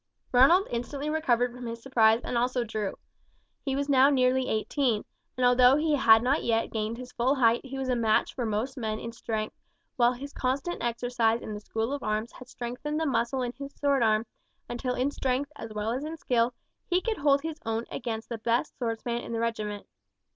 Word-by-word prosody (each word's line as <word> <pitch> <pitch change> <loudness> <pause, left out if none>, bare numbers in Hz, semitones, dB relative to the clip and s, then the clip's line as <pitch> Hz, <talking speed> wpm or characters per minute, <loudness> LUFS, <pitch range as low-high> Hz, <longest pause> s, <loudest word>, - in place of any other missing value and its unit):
Ronald 305 +10 +6
instantly 275 +5 -3
recovered 245 -6 +1
from 250 -1 -7
his 230 0 -5
surprise 230 -2 +3
and - - -3
also 245 +1 +1
drew. 215 -3 -3 0.7
He 270 -2 -1
was 280 +1 -1
now 275 -1 +6
nearly 260 -1 +2
eighteen, 220 0 0 0.3
and 250 - +2
although 250 +1 +6
he 305 +1 +1
had 225 -4 +6
not 270 +4 +1
yet 225 -1 +1
gained 220 +1 -2
his 250 0 -9
full 255 +4 +1
height 235 -3 +3
he 270 0 -7
was 265 -1 -3
a 250 - +1
match 225 -2 +2
for 250 - -3
most 230 +5 -2
men 220 -3 -2
in 230 +1 -6
strength, 220 -2 -4 0.4
while 240 0 +4
his 280 +3 -8
constant 270 +7 -2
exercise 235 -1 +1
in 215 - -5
the 210 - -5
school 225 +4 -3
of 285 - -3
arms 215 +2 -2
had 255 -1 -13
strengthened 250 +6 -4
the 320 - 0
muscle 255 -1 0
of 245 0 -4
his 280 0 -8
sword 280 -2 +1
arm, 220 0 +3 0.4
until 250 +1 -3
in 260 +3 0
strength 270 +1 -1
as 225 - -8
well 210 +1 -2
as 260 +4 -2
in 315 +2 -5
skill 245 -4 +1 0.3
he 360 0 +2
could 440 +2 -2
hold 280 0 +3
his 320 -1 -5
own 225 +1 -2
against 225 -2 -4
the 235 -2 -5
best 235 +6 0
swordsman 235 0 -2
in - - -7
the 230 - -1
regiment. 215 -3 -3
245 Hz, 205 wpm, -28 LUFS, 230-270 Hz, 0.7 s, Ronald